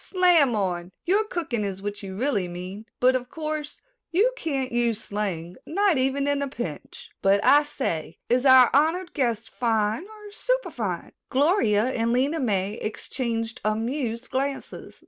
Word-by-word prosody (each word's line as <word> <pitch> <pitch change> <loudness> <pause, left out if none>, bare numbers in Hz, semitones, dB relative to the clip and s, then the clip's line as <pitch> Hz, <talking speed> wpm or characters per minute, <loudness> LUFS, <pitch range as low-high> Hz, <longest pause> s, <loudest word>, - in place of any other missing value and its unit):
"Slam 350 - +4
on, 180 -3 -2
your 400 +5 +3
cooking 295 - -2
is 195 -2 -3
what 205 +1 -5
you 190 -2 -7
really 220 -7 0
mean, 185 +5 -7
but 255 +1 +4
of 250 -1 -3
course 305 -1 -5 0.3
you 425 +9 +3
can't 275 - -2
use 235 -2 +1
slang, 185 -6 -4
not 380 -2 +2
even 270 +2 +1
in 285 0 +1
a 280 - -1
pinch. 210 - -7
But, 195 +1 +4
I 290 +1 +7
say, 215 - -4
is 245 +1 +2
our 260 -3 +7
honored 330 +6 +2
guest 235 -6 -1
fine 225 - 0
or 425 -1 -12
superfine?" - - -2 0.2
Gloria 265 - +3
and 230 -2 0
Lena 275 +6 +1
May 205 -4 0
exchanged 230 +1 -3
amused 230 +3 -2
glances. 275 +1 -4
250 Hz, 150 wpm, -25 LUFS, 210-295 Hz, 0.3 s, I